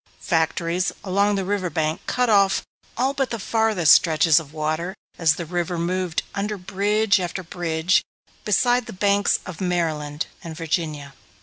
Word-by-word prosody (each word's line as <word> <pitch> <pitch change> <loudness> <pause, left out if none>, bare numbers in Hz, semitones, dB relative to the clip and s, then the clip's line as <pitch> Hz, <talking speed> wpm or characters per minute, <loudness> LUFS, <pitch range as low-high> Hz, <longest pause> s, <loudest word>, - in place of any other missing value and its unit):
Factories 170 +2 0
along 200 +2 +2
the 195 -1 -2
riverbank 170 -5 -1
cut 250 0 +1
off 200 -3 +3 0.3
all 260 +3 +1
but 270 -2 -1
the 230 - -3
farthest 220 -6 +2
stretches 160 -1 +4
of 150 -3 -11
water 155 +4 -2 0.2
as 160 -3 +4
the 170 - -5
river 175 +1 -2
moved 180 0 -1
under 205 +1 -2
bridge 200 +2 +1
after 185 +1 -4
bridge 165 +1 0 0.4
beside 245 +3 +2
the - - -7
banks 200 +1 +2
of 180 -3 -8
Maryland 160 -4 -1 0.2
and 165 -2 -8
Virginia. 155 -4 -3
180 Hz, 145 wpm, -23 LUFS, 160-200 Hz, 0.4 s, stretches